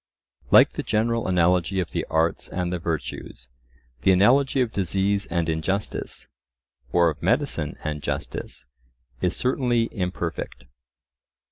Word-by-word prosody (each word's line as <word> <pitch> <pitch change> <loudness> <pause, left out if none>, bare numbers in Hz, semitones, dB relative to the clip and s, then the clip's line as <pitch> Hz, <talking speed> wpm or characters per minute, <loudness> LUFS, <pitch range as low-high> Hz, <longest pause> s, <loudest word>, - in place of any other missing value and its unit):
Like - - +7
the - - -3
general 115 +1 0
analogy 90 +1 +2
of 90 - -2
the - - -2
arts 80 +1 0
and 90 -1 -2
the 90 - -2
virtues, 80 -6 -5 0.5
the 95 - +4
analogy 130 +9 +4
of 125 -3 +1
disease 100 +1 0
and 85 -1 -1
injustice, 80 +5 -3 0.6
or 85 -1 +4
of 75 - -11
medicine 120 - 0
and 75 -1 -3
justice, - - -5 0.6
is 90 -1 0
certainly 125 -3 +1
imperfect. 90 - -4
90 Hz, 125 wpm, -24 LUFS, 85-110 Hz, 0.6 s, Like